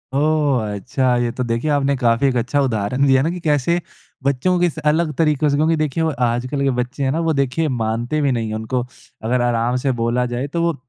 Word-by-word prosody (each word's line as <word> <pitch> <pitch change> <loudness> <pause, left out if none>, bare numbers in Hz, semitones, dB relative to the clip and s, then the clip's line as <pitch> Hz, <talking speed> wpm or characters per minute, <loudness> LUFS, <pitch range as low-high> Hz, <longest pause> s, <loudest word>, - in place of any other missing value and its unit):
ओह! 145 -4 +2
अच्छा। 125 +4 0
ये 120 -1 0
तो 125 - 0
देखिए 115 +4 -1
आपने 140 -1 +2
काफ़ी 120 +1 +2
एक 130 - 0
अच्छा 130 +5 0
उदाहरण 125 +1 0
दिया 135 -1 +4
ना 160 - +1
कि 180 +1 -4
कैसे 150 +3 +2 0.4
बच्चों 140 +7 +1
की 175 - +3
स - - -12
अलग 160 0 0
तरीकों 150 -2 +2
से 140 - +1
क्योंकि 155 +3 +2
देखिए 155 0 -1
वो 160 - +2 0.2
आजकल 125 +4 -1
के 140 - +2
बच्चे 135 +3 -5
हैं 130 - +1
ना 160 - -1
वो - - +2
देखिए 140 +4 0
मानते 120 +6 -1
भी 140 - +2
नहीं 115 -3 -1
है। 110 - -3
उनको 110 +3 -2 0.4
अगर 125 +2 +1
आराम 120 0 +1
से 135 - +3
बोला 120 +2 +1
जाए 130 +4 -2
तो 170 - 0
वो 170 -1 +2
135 Hz, 230 wpm, -20 LUFS, 120-150 Hz, 0.4 s, दिया